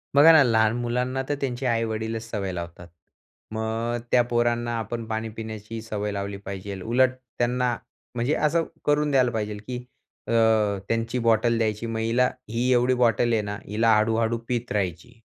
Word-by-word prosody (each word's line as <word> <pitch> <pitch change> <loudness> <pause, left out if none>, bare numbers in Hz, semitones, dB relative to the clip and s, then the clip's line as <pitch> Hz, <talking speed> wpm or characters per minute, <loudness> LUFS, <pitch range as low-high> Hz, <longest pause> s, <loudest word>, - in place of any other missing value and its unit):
बघा 150 +4 +9
ना, 160 - +8
लहान 110 -2 +3
मुलांना 125 +2 -1
तर 145 - +1
त्यांचे 130 -1 -2
आई-वडीलच 115 -1 -1
सवय 100 -4 -3
लावतात. 85 0 -7 0.6
मग 110 +2 -2
त्या 125 - +6
पोरांना 120 0 +1
आपण 115 +1 -4
पाणी 110 0 -3
पिण्याची 110 0 -6
सवय 105 -2 -3
लावली 100 0 -4
पाहिजेल. 95 0 -6
उलट 125 +4 +3 0.3
त्यांना 125 0 +1 0.4
म्हणजे 120 +5 +1
असं 160 +2 +1 0.2
करून 150 0 +2
द्यायला 130 -3 +3
पाहिजे 105 -2 -3
की 125 -1 -4 0.4
अ, - - -3 0.6
त्यांची 115 +2 -1
बॉटल 115 0 +3
द्यायची, 110 0 -1
मग 115 -1 -3
हिला 120 +3 +2 0.2
ही 120 +3 0
एवढी 125 +1 +3
बॉटल 120 0 +3
आहे 110 - +2
ना, 105 0 -5
हिला 110 +2 +3
हळ-हळू 115 +1 +2
पीत 120 -1 -2
राहायची. 90 -5 -2
115 Hz, 160 wpm, -25 LUFS, 110-125 Hz, 0.6 s, बघा